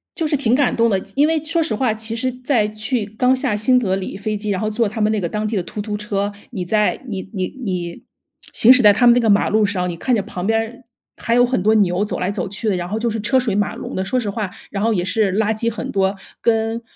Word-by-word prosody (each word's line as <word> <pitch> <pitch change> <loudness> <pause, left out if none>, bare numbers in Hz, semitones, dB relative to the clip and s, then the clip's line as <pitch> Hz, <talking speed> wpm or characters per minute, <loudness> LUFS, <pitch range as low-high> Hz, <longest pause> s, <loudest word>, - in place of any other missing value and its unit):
就 325 - -1
是 295 -1 +1
挺 240 -4 +1
感 280 -1 +2
动 230 0 +3
的。 195 -3 +1 0.2
因 290 +2 +4
为 320 -1 0
说 330 +1 0
实 310 - -2
话， 225 0 +1
其 220 +1 -3
实 255 +2 -1
在 250 -3 0
去 215 +2 -2
刚 250 +5 +1
下 260 -5 0
新 250 +5 +3
德 190 -6 0
里 195 - -5
飞 210 +1 -3
机， 210 0 -4
然 190 0 -1
后 215 - 0
坐 225 0 0
他 220 +2 -4
们 210 +1 +2
那 215 - 0
个 170 - -1
当 215 +2 -2
地 225 - -3
的 190 - 0
突 205 +4 -6
突 210 0 -4
车。 205 -1 -2 0.2
你 195 -7 -4
在 210 +7 +1
你 190 -3 -5
你 185 -2 -1 0.2
你 175 -3 -4 0.5
行 235 - +6
驶 255 -2 +6
在 205 - +8
他 245 +4 +3
们 235 - +8
那 245 - +4
个 225 - +1
马 200 0 +3
路 215 0 +3
上， 185 -3 -1
你 170 - -5
看 250 +6 +1
着 210 - +1
旁 180 -1 -6
边 225 0 +2
儿， 235 +3 -6 0.3
还 230 - -1
有 245 - +5
很 245 -7 -1
多 215 +2 +4
牛 195 -1 +2
走 - - -4
来 185 +2 -1
走 - - -3
去 210 +3 -2
的， 195 - +1
然 175 0 -4
后 215 +3 -2
就 235 0 0
是 220 0 -3
车 260 +5 +2
水 230 -6 -1
马 205 -1 0
龙 - - -7
的。 190 - -2
说 250 +6 0
实 215 - -3
话， 200 -2 -3 0.2
然 200 +1 -2
后 230 - +2
也 180 -4 0
是 195 0 +1
垃 220 0 +2
圾 230 +1 0
很 220 - -5
多， 195 0 +1 0.3
跟 225 0 +1
215 Hz, 310 characters per minute, -19 LUFS, 200-235 Hz, 0.5 s, 在